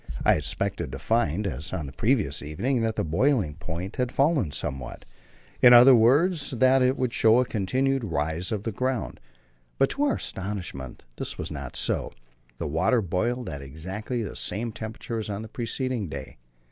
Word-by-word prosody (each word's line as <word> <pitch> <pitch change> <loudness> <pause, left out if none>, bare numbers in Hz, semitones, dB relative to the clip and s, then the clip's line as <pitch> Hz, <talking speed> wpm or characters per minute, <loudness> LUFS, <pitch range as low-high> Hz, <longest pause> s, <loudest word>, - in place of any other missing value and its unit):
I - - +6
expected 65 -2 -2
to - - -4
find, 105 -4 0
as 75 -5 -4
on 85 -5 -3
the 70 - -7
previous 105 - 0
evening, 110 - -1
that 110 -1 0
the - - 0
boiling 95 - +1
point 85 +4 -6
had 125 -1 0
fallen 140 - +2
somewhat; 65 -2 -5 0.6
in 125 -1 +9
other 125 +2 +9
words, 145 +9 +4
that 130 +1 +4
it 130 +1 +2
would 125 -2 -1
show 115 +2 +5
a 125 - +2
continued 130 +5 0
rise 80 -1 -2
of 105 -2 -2
the 115 - -2
ground, 130 +3 -2 0.6
but 135 - +3
to 280 - -1
our 280 - +2
astonishment 90 -10 -5
this - - -4
was - - -4
not - - -6
so. - - 0 0.4
The 85 - -4
water 80 - +2
boiled 120 +8 -1
at 70 -2 -5
exactly 95 - -4
the 105 - -6
same 115 +5 -2
temperature 110 +1 -5
as 110 - -4
on 100 +1 -4
the - - -7
preceding 120 - -2
day. 70 - -8
110 Hz, 180 wpm, -26 LUFS, 85-125 Hz, 0.6 s, in